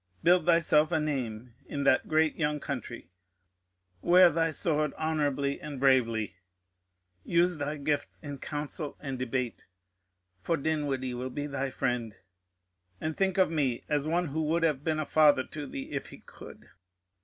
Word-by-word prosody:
Build 175 -1 +4
thyself 160 -2 +4
a 160 - +2
name 125 -6 -3
in 140 - -3
that 130 -2 +3
great 160 -1 +2
young 150 -2 -1
country, 120 - -6 0.9
wear 180 0 +6
thy 165 +1 +1
sword 155 -2 0
honourably 145 -3 -1
and 145 -3 -6
bravely, 115 -7 +2 0.9
use 175 0 +2
thy 150 +1 -3
gifts 145 0 -2
in 145 -3 -7
council 150 +1 -5
and 135 -3 -5
debate 125 -1 -3 0.7
for 165 - 0
Dinwiddie 140 -4 -1
will 125 +1 -4
be 145 +3 -4
thy 140 -2 -2
friend 125 -4 -2 0.8
and 155 0 -3
think 190 -1 0
of 185 -4 +4
me 135 -7 0
as 150 -1 0
one 170 0 0
who 160 +3 -2
would 165 +2 0
have 150 -4 +1
been 155 0 0
a 155 - -1
father 150 -3 +4
to 145 +2 -7
thee 135 - -7
if - - -4
he - - -11
could. - - -14
145 Hz, 155 wpm, -29 LUFS, 130-160 Hz, 0.9 s, wear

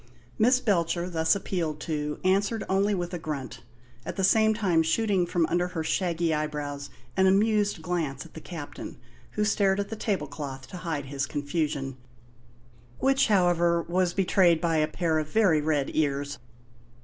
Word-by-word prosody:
Miss 250 +3 +5
Belcher, 175 -6 0
thus 160 0 +2
appealed 170 -6 -2
to, 150 -2 -3
answered 200 +3 +1
only 200 +2 +2
with 175 -1 -4
a 175 - -3
grunt, 145 -5 -5 0.4
at - - -5
the 195 - -2
same 220 +3 +4
time 185 -7 +2
shooting 185 +2 +1
from 170 -1 +1
under 175 +2 0
her 170 -3 -4
shaggy 170 0 0
eyebrows 150 -2 -3 0.3
an 190 0 +4
amused 205 -2 +2
glance 160 -6 -2
at - - -15
the 160 - -9
Captain, 160 -4 -8 0.4
who 210 - 0
stared 200 -2 +2
at 200 - -2
the 225 - -4
table 200 -8 -1
cloth 135 -2 -7
to 180 - -7
hide 160 -5 -3
his 140 0 -3
confusion, 145 -2 -2 1.0
which, 270 0 +3
however, 175 -4 +3
was 180 0 0
betrayed 180 -3 +4
by 165 -1 +1
a 155 0 +2
pair 160 0 0
of 155 -1 -4
very 185 -6 +3
red 150 -2 0
ears. 145 -1 -1
170 Hz, 165 wpm, -27 LUFS, 150-195 Hz, 1.0 s, Miss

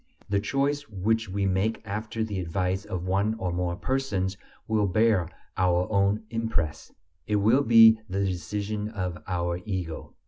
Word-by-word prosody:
The 100 0 +2
choice 140 +5 -1
which 110 +2 0
we 100 +1 -1
make 95 +4 +1
after 110 +2 -3
the 105 -3 -3
advice 90 +2 -1
of 90 -1 -4
one 100 +4 +1
or 95 -6 -3
more 90 0 -1
persons 100 -6 -1 0.3
will 110 -2 +2
bear 105 -3 +2 0.3
our 90 -1 +2
own 100 +1 +2
impress, 115 -10 -2 0.4
it 105 - +1
will 110 +7 +4
be 115 -3 +7
the 100 +1 0
decision 105 +4 -3
of 90 -5 -4
our 85 -1 -1
ego. 90 -6 -5
100 Hz, 150 wpm, -27 LUFS, 90-110 Hz, 0.4 s, be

